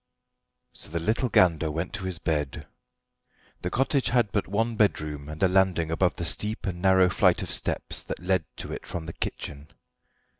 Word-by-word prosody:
So - - -10
the 85 +2 -2
little 115 +9 0
Gander 85 -6 +4
went 80 +5 -3
to 100 -2 -3
his 95 -2 -2
bed. 75 -5 -2 1.0
The - - -2
cottage 135 +1 +1
had 120 -5 +2
but 100 - -1
one 115 +4 0
bedroom 75 -8 0
and 80 +4 -4
a - - +7
landing 90 -3 +2
above 90 +2 +1
the 85 - -4
steep 105 +5 -1
and 90 -2 -3
narrow 95 -1 +5
flight 90 - +3
of - - -5
steps - - 0
that - - -4
led 90 0 +1
to - - -6
it - - -7
from 85 -2 -5
the 85 - -6
kitchen. 75 0 -5
90 Hz, 185 wpm, -27 LUFS, 80-100 Hz, 1.0 s, a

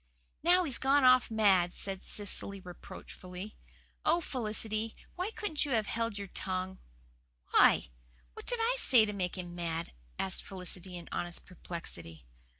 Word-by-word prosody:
"Now 360 +3 +5
he's 275 -8 -2
gone 275 +1 +4
off 255 -1 +6
mad," 195 -5 +4
said 195 -1 -4
Cecily 200 -1 -3
reproachfully. 180 +1 -9 0.5
"Oh, 335 +3 +4
Felicity, 220 -5 -2 0.2
why 365 +3 -2
couldn't 415 -9 -1
you 285 -3 -1
have 220 -2 +2
held 230 -1 -1
your 200 -1 -5
tongue?" 185 0 -3 0.7
"Why, - - +6 0.4
what - - -11
did 485 - +2
I 470 +2 +2
say 240 - +7
to 210 - -3
make 185 -2 -2
him 175 -1 -6
mad?" 170 -1 -3 0.3
asked 190 -1 +1
Felicity 180 -1 -4
in 170 - -9
honest 175 0 -3
perplexity. 85 - -8
200 Hz, 150 wpm, -32 LUFS, 180-255 Hz, 0.7 s, say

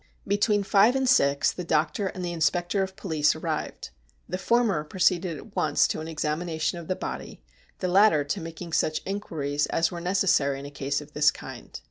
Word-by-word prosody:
Between 205 +1 +2
five 205 +5 +4
and 265 -1 +1
six 140 - +3
the 180 - -6
doctor 160 +4 0
and 185 -1 -5
the 175 - -3
inspector 175 +4 +1
of 190 0 -3
police 155 -6 +1
arrived. - - -4 0.4
The 185 +2 -4
former 220 -7 +2
proceeded 175 0 +1
at 200 - -13
once 155 -5 +3
to - - -2
an 160 - -6
examination 160 +1 -2
ol 170 - -9
the 185 - -1
body, - - -7 0.4
the 185 - 0
latter 185 -4 +5
to 150 +7 -3
making 165 +1 -8
such 155 0 0
inquiries 150 -8 -2
as 165 +2 +1
were 170 -1 -6
necessary 175 -7 +2
in 140 - -8
a 145 - -8
case 140 +1 -2
of 150 0 -14
this 150 0 +4
kind. - - -8
170 Hz, 190 wpm, -26 LUFS, 150-195 Hz, 0.4 s, latter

